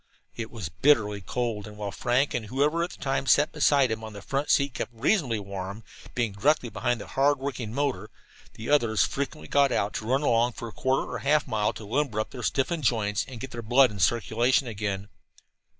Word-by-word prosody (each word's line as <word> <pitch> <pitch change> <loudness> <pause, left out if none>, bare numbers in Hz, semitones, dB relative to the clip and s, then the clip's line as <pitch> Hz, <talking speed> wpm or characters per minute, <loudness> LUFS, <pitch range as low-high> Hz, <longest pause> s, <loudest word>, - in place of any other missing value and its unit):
It 115 -1 -5
was 110 -9 -6
bitterly 105 - +2
cold, 110 -1 -3
and 105 0 -11
while 105 -1 -4
Frank 125 +6 +1
and 115 -3 -3
whoever 145 +8 +1
at 175 - -2
the - - -11
time 135 0 -2
sat 145 +4 +4
beside 140 -4 +3
him 110 0 -3
on 110 -1 -7
the 100 - -9
front 140 +1 -2
seat 140 -2 +3
kept - - -3
reasonably 120 - +1
warm, 100 +1 -6 0.3
being 120 -4 0
directly 125 +5 +1
behind 120 +1 -1
the - - -7
hard 140 +1 +2
working 130 -5 -4
motor, 125 -6 -2 0.5
the 110 - -7
others 115 -7 +3
frequently 135 - -4
got 140 -2 +3
out, 100 -3 0
to 110 - -4
run 135 +4 +1
along 120 -2 +2
for 115 - -7
a - - -8
quarter 130 +1 0
or - - -4
half 150 +2 +2
a - - -14
mile 105 -1 +1
to 110 - -9
limber 120 0 -1
up 110 - -2
their 125 - -7
stiffened 145 +6 0
joints 105 -5 +1
and 125 -3 -9
get 135 - -6
their 120 - -5
blood 125 +3 +4
in 100 - -8
circulation 120 - +2
again. 100 -2 -3
120 Hz, 215 wpm, -27 LUFS, 105-140 Hz, 0.5 s, sat